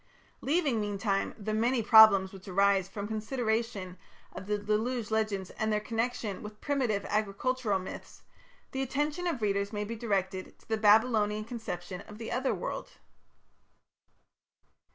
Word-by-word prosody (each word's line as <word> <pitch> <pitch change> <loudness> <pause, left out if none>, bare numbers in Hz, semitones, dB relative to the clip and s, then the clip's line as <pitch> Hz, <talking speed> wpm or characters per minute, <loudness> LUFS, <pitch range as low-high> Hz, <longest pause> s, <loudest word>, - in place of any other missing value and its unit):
Leaving, 280 -7 +1
meantime, 200 -1 -1
the 215 0 -3
many 230 +2 +1
problems 205 -4 +7
which 190 0 -12
arise 195 0 +3
from 200 +1 -5
consideration 220 -4 -2 0.3
of 190 +1 -8
the 210 0 +1
Deluge 215 +2 -1
legends 215 -4 -1
and 220 0 -2
their 210 - +2
connection 225 -2 -2
with 210 0 -9
primitive 255 -8 0
agricultural 215 +2 0
myths, 185 0 -9 0.5
the 265 - -2
attention 295 +6 -1
of 270 -10 -2
readers 200 0 0
may 210 -1 -2
be 225 +3 -5
directed 195 -4 -2
to - - -25
the 225 - +1
Babylonian 215 0 +4
conception 185 -6 -6
of 210 - -11
the 225 0 -6
Otherworld. 260 +2 -2
215 Hz, 135 wpm, -30 LUFS, 200-235 Hz, 0.5 s, problems